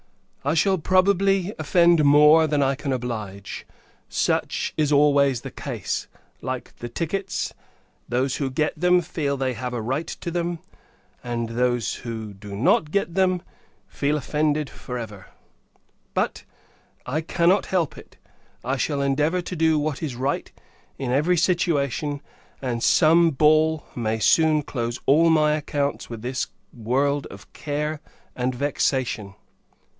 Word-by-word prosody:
I 145 +4 +1
shall, 190 +2 +3
probably, 195 +2 +2
offend 170 +2 +4
many 145 -2 +5
more 150 +2 +7
than 145 -2 +1
I 135 0 +2
can 140 0 -4
oblige. 110 -6 -5 0.4
Such - - 0
is 150 -2 +1
always 140 -3 +4
the - - -7
case: - - -4 0.3
like 130 0 -5
the 120 - -6
tickets 185 +8 -3 0.6
those 130 +2 0
who 140 -2 -1
get 150 +4 0
them, 180 +2 +3
feel 145 -4 -2
they 130 -1 -1
have 125 0 -4
a 120 - -2
right 135 +8 -2
to 170 - -5
them; 175 0 -2 0.7
and 120 -1 -3
those 120 0 0
[who] 110 -3 -6
do 100 0 -9
not 135 +7 +2
get 175 -1 -1
them, 185 -1 +1 0.4
feel 145 +1 -1
offended 150 +1 0
for 125 -2 -7
ever. 105 -5 -8 0.9
But, - - -1 0.6
I 145 +5 -1
cannot 170 +4 +2
help 175 -5 0
it: - - -14 0.5
I 135 +2 0
shall 140 +1 -1
endeavour 150 +6 +1
to 180 - -5
do 160 -1 +3
what 150 -1 -2
is 145 -6 -3
right, 135 +3 -2 0.5
in 130 -3 -3
every 155 +7 +2
situation; 150 -5 0 0.4
and 120 -3 -3
some 165 +4 +5
ball 155 +1 +3
may 110 -2 -1
soon 155 +6 +3
close 120 -3 -3
all 160 +5 +5
my 155 -2 +4
accounts 145 -2 -2
with 115 -2 -7
this 130 +2 -2 0.3
world 135 +5 0
of 95 -1 -14
care 150 +1 -3 0.4
and 125 0 -1
vexation! 130 -6 -1
145 Hz, 145 wpm, -24 LUFS, 125-160 Hz, 0.9 s, more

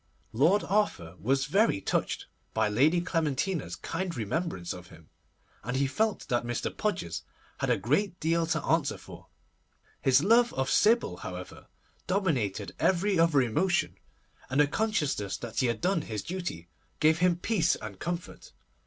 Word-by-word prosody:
Lord 165 - +4
Arthur 175 - 0
was 135 +8 +1
very 200 +9 +3
much 95 - -8
touched - - -1 0.3
by 110 -1 +3
Lady 145 +11 +3
Clementina's 165 -1 -1
kind 170 -2 -4
remembrance 110 - -2
of 90 -1 -10
him, 80 -3 -17 0.5
and 125 +4 -2
felt 220 +2 0
that 120 -1 +1
Mr. 120 0 -3
Podgers 145 - -2 0.4
had - - -1
a - - +3
great 150 - 0
deal 165 +1 +1
to 160 -2 -1
answer 160 -3 +1
for. - - -13 0.7
His 135 +2 +4
love 235 +4 +4
of 135 0 0
Sybil, 215 - +3
however, 90 0 -8 0.4
dominated 135 - 0
every 190 0 +2
other 160 -5 +4
emotion, 170 +10 +1 0.5
and 130 +3 0
the 150 - +7
consciousness 145 - -1
that 115 -2 -5
he 130 - +3
had 115 -2 -2
done 180 -2 +1
his 110 -7 -5
duty 175 - -5 0.3
gave 155 +1 +4
him 180 -1 +4
peace 175 -1 +1
and 100 -3 -8
comfort. 175 - -5
155 Hz, 155 wpm, -29 LUFS, 115-185 Hz, 0.7 s, the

